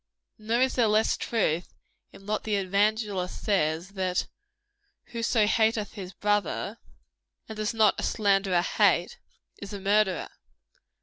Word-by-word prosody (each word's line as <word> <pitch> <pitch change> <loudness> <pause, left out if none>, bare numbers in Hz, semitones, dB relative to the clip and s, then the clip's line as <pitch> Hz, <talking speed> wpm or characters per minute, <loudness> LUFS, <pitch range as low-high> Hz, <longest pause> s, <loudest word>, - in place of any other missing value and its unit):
Nor 225 +3 0
is 260 0 +2
there 240 -3 +3
less 215 +1 +3
of - - -5
truth 175 -7 -1 0.4
in 195 - -15
what 215 +1 -2
the 215 -1 -1
evangelist 200 -1 0
says, 170 -3 0
that 185 -2 -1 0.9
"whoso 230 -2 +1
hateth 220 0 +1
his 190 -4 -7
brother" 205 +2 -1 0.7
(and 220 - -7
does 215 +1 -2
not 215 -2 +3
a - - -4
slanderer 195 -4 +2
hate?) 485 - +2 0.4
"is 200 0 -7
a 200 - -5
murderer." 195 -1 +1
210 Hz, 135 wpm, -27 LUFS, 190-220 Hz, 0.9 s, there